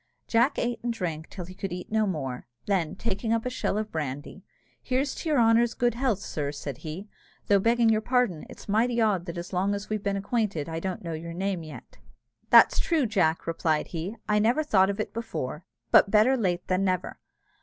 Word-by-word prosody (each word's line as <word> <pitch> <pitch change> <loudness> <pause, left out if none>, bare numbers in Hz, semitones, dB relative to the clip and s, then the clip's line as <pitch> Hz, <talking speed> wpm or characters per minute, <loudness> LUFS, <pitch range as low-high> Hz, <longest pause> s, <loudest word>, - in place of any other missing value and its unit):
Jack 230 0 +3
ate 240 -1 -1
and 240 - 0
drank 165 -7 -4
till 180 -3 -7
he 185 - -10
could 195 0 -5
eat 180 +3 -6
no 220 -1 +2
more: 135 -10 -4 0.2
then, 185 -4 0
taking 220 +2 -2
up 230 0 +1
a 250 - -1
shell 250 - -1
of 215 0 -3
brandy, 145 +4 -5 0.4
"Here's 265 +2 0
to 325 - -5
your 300 - +3
honour's 230 0 +4
good 240 -1 +2
health, 240 -3 0
sir," 145 -6 -4
said 140 -3 -6
he; 165 +7 -7 0.4
"though, 200 -1 +4
begging 230 +2 +3
you 215 -1 +3
pardon, 240 -9 +1
it's - - -12
mighty 235 +4 +2
odd 200 -6 +1
that 170 - -5
as 175 +2 -6
long 195 +3 +1
as 200 +1 -7
we've 215 -1 -1
been 200 -1 -1
acquainted 200 -6 -1
I 165 0 -3
don't 185 +2 -4
know 165 -1 -4
your 165 +1 -6
name 190 0 -2
yet." 155 -2 -11 0.5
"That's - - +7
true, 330 -7 +1
Jack," 180 -7 +1
replied 165 -2 0
he; 180 +7 -5
"I 210 0 +3
never 235 +8 +2
thought 195 -10 +4
of 200 +1 -3
it 215 - -3
before, 170 - -5 0.3
but - - +7
better 220 +6 +5
late 180 -7 -1
than 185 +1 +1
never. 185 -2 -1
200 Hz, 210 wpm, -27 LUFS, 170-230 Hz, 0.5 s, That's